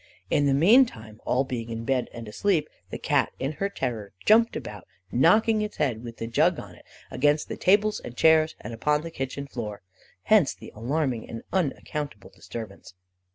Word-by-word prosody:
In 145 -1 +3
the 135 - +3
meantime, 155 - +3
all 130 +2 +2
being 120 -3 -5
in 115 0 -5
bed 130 0 0
and 115 -2 -8
asleep, 155 - 0 0.2
the - - -5
Cat - - +1
in 135 +2 -2
her 200 - +1
terror 115 - -4
jumped 230 +2 +5
about, 105 -3 -7 0.2
knocking 215 - +4
its 210 0 -4
head, 120 -4 -1
with 115 -1 -8
the - - -4
jug 155 +10 +2
on 100 -3 -10
it, 85 - -18 0.3
against 145 +2 +1
the - - -3
tables 210 +3 +3
and 120 - -10
chairs, 160 0 +4
and 120 - -7
upon 150 +6 +1
the 165 +1 -7
kitchen 135 -1 -4
floor. 110 -7 -6 0.4
Hence 210 -10 +4
the - - -12
alarming 125 +1 -2
and 115 - -7
unaccountable 145 - -3
disturbance. 105 -5 -9
135 Hz, 180 wpm, -26 LUFS, 115-165 Hz, 0.4 s, jumped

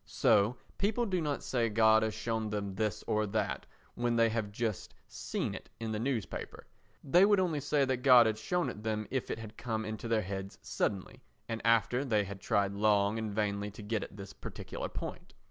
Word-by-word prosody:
So 110 +3 +3 0.2
people 220 +4 +1
do 185 -5 0
not 145 -3 -2
say 120 -3 0
God 110 0 +5
has 110 -1 -1
shown 110 0 -2
them 100 -2 -3
this 105 +1 -2
or 110 0 +1
that 100 - -2 0.3
when 120 0 0
they 115 -1 +4
have 110 -2 -2
just 110 -2 -3
seen - - -3
it - - -9
in 115 -1 -3
the 105 - -2
newspapers; 115 -5 -3 0.4
they 175 +7 +5
would 205 0 +5
only 170 -5 +1
say 145 0 +2
that 130 -1 0
God 125 -2 +7
had 110 -1 0
shown 180 +9 0
it 105 - -7
them 110 -1 -2
if 130 -1 -2
it - - -2
had 110 -1 -9
come 110 -2 -2
into 110 +2 -5
their 115 -2 +2
heads 95 +1 -5
suddenly 100 -3 -2 0.3
and 115 0 -3
after 115 +3 +3
they 110 -6 +2
had 100 0 -8
tried 100 0 +1
long 105 +1 +2
and 110 -1 -3
vainly 100 -1 -1
to 105 +1 -10
get 110 +1 -1
at 100 - -10
this 100 -1 -8
particular - - -6
point. - - -7
110 Hz, 205 wpm, -32 LUFS, 105-120 Hz, 0.4 s, God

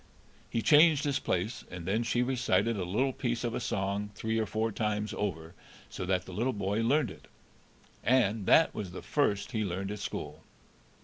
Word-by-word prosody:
He 115 - -1
changed 155 -1 +6
his 140 -2 0
place, 95 +7 -2
and 90 -2 -7
then 100 +5 +1
she 120 +1 +1
recited 120 -3 +1
a 95 - -2
little 125 +9 0
piece 120 -3 -2
of 120 -1 -1
a - - -1
song 100 -2 -2
three 110 0 -1
or 110 - 0
four 110 +2 -1
times 105 0 -2
over 80 -5 -3 0.4
so 90 - -5
that 90 -1 +1
the 95 - -9
little 120 +7 0
boy 100 +1 -1
learned 125 -1 +2
it, - - -14 0.8
and 110 -4 +2
that 165 - +5
was 95 -5 -5
the - - -7
first 105 -8 0
he 110 -3 -1
learned 95 +1 -3
at 105 - -5
school. - - -5
110 Hz, 190 wpm, -30 LUFS, 95-120 Hz, 0.8 s, changed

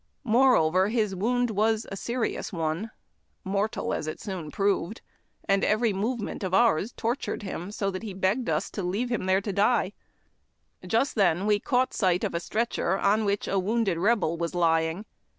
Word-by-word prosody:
Moreover, 215 -7 +4
his 215 -3 0
wound 245 +5 0
was 220 +1 +1
a - - -3
serious 235 +4 -3
one, 165 +4 -2 0.3
— - - -46
mortal 200 +3 -1
as - - -3
it 155 - -5
soon 185 -7 -5
proved, 200 +3 0 0.3
— - - -33
and 195 0 +2
every 215 0 +2
movement 210 +2 -3
of 185 0 0
ours 220 -1 +3
tortured 235 -1 -3
him 185 -2 -5
so 200 -1 -2
that 185 - -5
he 210 -4 -6
begged 195 +6 0
of - - +2
us - - -3
to 205 - -4
leave 200 +7 -2
him 220 -6 -1
there 190 +1 +3
to 200 0 -4
die. 205 0 +2 0.9
Just 230 +8 +1
then 190 -2 +2
we 210 -1 +3
caught 255 +3 +1
sight 185 -3 +1
of - - -1
a 170 - 0
stretcher 195 -1 -1
on 210 +2 +2
which 200 0 -1
a 195 - +1
wounded 200 -2 0
Rebel 190 -4 +2
was 170 +1 -3
lying. 165 +2 +1
200 Hz, 185 wpm, -27 LUFS, 185-225 Hz, 0.9 s, Moreover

